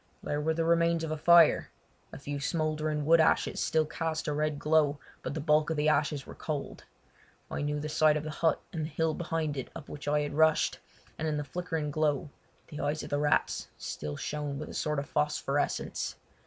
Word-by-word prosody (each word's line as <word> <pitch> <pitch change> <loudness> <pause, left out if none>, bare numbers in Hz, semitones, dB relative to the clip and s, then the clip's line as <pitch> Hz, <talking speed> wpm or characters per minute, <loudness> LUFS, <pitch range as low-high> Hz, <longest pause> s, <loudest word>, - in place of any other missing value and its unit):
There 145 0 -1
were 160 +1 0
the 165 0 0
remains 170 0 +3
of 160 - -3
a - - 0
fire—a 170 0 +3
few 145 +1 -5
smouldering 155 0 -1
wood 165 +1 +6
ashes 160 - +2
still 160 -1 +2
cast 160 +1 -3
a 150 - 0
red 150 0 0
glow, 150 -1 +3 0.2
but - - -4
the - - -2
bulk 150 +1 +3
of 160 - -1
the 150 +1 +3
ashes 145 -2 +1
were - - -9
cold. 150 -3 -5 0.7
I - - -2
knew 150 0 -1
the 150 - -4
site 155 0 +4
of 150 - -4
the 155 - -4
hut 160 0 +1
and 160 -3 -2
the - - -5
hill 160 +1 0
behind 160 -3 -2
it 130 - -4
up 155 - -9
which 145 0 -8
I 150 0 +2
had 145 - -3
rushed, 160 +1 +3 0.4
and 160 - -1
in 150 -1 0
the 150 - -2
flickering 160 0 -3
glow 145 -2 0 0.4
the 150 - -7
eyes 145 +2 -1
of - - -8
the 145 - +1
rats 150 0 +1
still 75 -1 -5
shone 150 -2 -3
with 155 - -6
a - - -8
sort 150 -1 -1
of 140 +1 -2
phosphorescence. 145 -2 -1
150 Hz, 210 wpm, -30 LUFS, 145-160 Hz, 0.7 s, wood